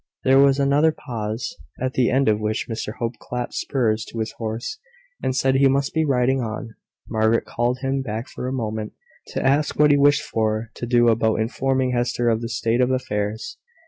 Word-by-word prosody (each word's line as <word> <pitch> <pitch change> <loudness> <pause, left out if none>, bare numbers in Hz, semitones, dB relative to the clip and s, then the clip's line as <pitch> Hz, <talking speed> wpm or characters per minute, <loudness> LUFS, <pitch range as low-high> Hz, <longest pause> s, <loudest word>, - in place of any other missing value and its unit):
There 135 +1 +5
was 140 -1 +5
another 140 +3 +4
pause, 115 -5 -5 0.2
at 130 +1 -2
the 125 -2 +2
end 135 0 +2
of 105 -1 +3
which 110 +1 -2
Mr 110 -2 -4
Hope 115 -1 -4
clapped 125 0 -5
spurs 110 -5 0
to - - -10
his 110 -1 -2
horse, 115 - -4 0.4
and 130 - -1
said 135 0 +2
he 135 +1 +5
must 140 +1 +1
be 160 -1 +2
riding 130 -1 +2
on. 110 0 -5 0.3
Margaret 110 0 +1
called 120 +2 -1
him 135 0 0
back 110 -1 -4
for 125 - -6
a - - -2
moment, 110 -4 -3 0.3
to - - -3
ask 140 +3 +2
what 150 0 +5
he 145 - +5
wished 145 +1 +4
her 110 0 0
to - - -5
do 120 0 +4
about 110 -1 +2
informing 130 +3 0
Hester 120 -1 0
of 115 0 +1
the 115 - -4
state 115 +2 0
of 125 - +3
affairs. 110 -4 -2
120 Hz, 200 wpm, -22 LUFS, 110-135 Hz, 0.4 s, There